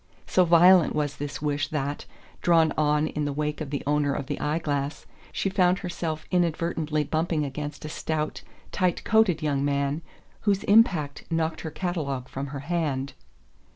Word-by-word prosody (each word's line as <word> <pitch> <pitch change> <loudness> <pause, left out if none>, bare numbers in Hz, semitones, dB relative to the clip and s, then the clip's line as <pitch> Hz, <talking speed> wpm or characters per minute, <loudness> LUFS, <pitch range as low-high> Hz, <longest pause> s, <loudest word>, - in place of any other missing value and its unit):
So 185 - +3
violent 175 +1 +6
was 145 -1 -1
this 145 0 -5
wish 145 -1 0
that, 145 -1 -3 0.3
drawn 165 -2 +4
on 150 0 +2
in 150 -1 -2
the 145 - -1
wake 150 +2 -2
of 150 - -4
the 140 0 -3
owner 145 -1 +1
of 140 - -3
the - - -4
eye 150 +2 0
glass, 145 -2 -3 0.3
she - - -1
found 185 -1 +3
herself 165 -4 -4
inadvertently 165 -3 0
bumping 160 0 0
against 145 +2 -6
a - - -5
stout 155 0 -3 0.3
tight 185 -3 0
coated 210 -8 +3
young 140 -2 0
man 140 +2 0 0.4
whose 200 -2 +1
impact 190 - +3
knocked 160 -1 -1
her 160 - -4
catalogue 155 -6 -3
from 135 +1 -4
her 140 0 -6
hand. 145 -4 -2
155 Hz, 165 wpm, -26 LUFS, 145-170 Hz, 0.4 s, violent